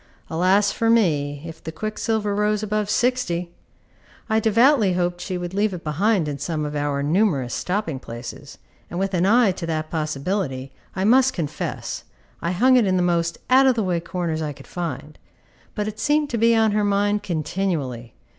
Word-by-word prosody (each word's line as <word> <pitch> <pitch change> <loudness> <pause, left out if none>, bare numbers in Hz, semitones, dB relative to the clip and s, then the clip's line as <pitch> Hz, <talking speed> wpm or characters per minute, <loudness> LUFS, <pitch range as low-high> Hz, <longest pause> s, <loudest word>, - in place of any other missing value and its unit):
Alas 185 +5 +3
for 230 - 0
me 145 -10 +2
if 165 -1 -9
the 160 - -5
quicksilver 215 +3 -2
rose 210 +1 +1
above 210 0 -1
60! 215 -8 0 0.8
I 220 - +4
devoutly 225 -1 +4
hoped 175 0 -1
she 185 -2 -3
would 175 0 -5
leave 205 -1 +1
it 170 - -9
behind 175 +3 +1
in 145 -1 -4
some 155 -3 -2
of 150 0 -4
our 145 -1 -1
numerous 150 - +1
stopping 180 -7 -2
places, 120 +4 -9 0.3
and 175 - -5
with 195 0 -1
an 180 +1 +2
eye 230 -1 +5
to 175 -2 -6
that 155 -1 -3
possibility, 150 -3 -2 0.2
I 190 - -1
must 260 +4 +5
confess, 155 -5 -4 0.4
I 170 - -1
hung 255 +8 +4
it 230 -5 +3
in 185 -1 +2
the 180 - +2
most 170 -1 0
out 265 +2 +6
of 260 - +4
the 225 - 0
way 180 -3 0
corners 170 -2 -3
I 150 -2 -3
could - - -14
find; 155 -4 -6 0.6
but 210 -1 -2
it 215 0 -6
seemed 295 0 +1
to 235 - -1
be 230 +1 +4
on 220 -1 +3
her 210 0 +1
mind 205 +1 +1
continually. 155 - -3
185 Hz, 185 wpm, -23 LUFS, 155-215 Hz, 0.8 s, out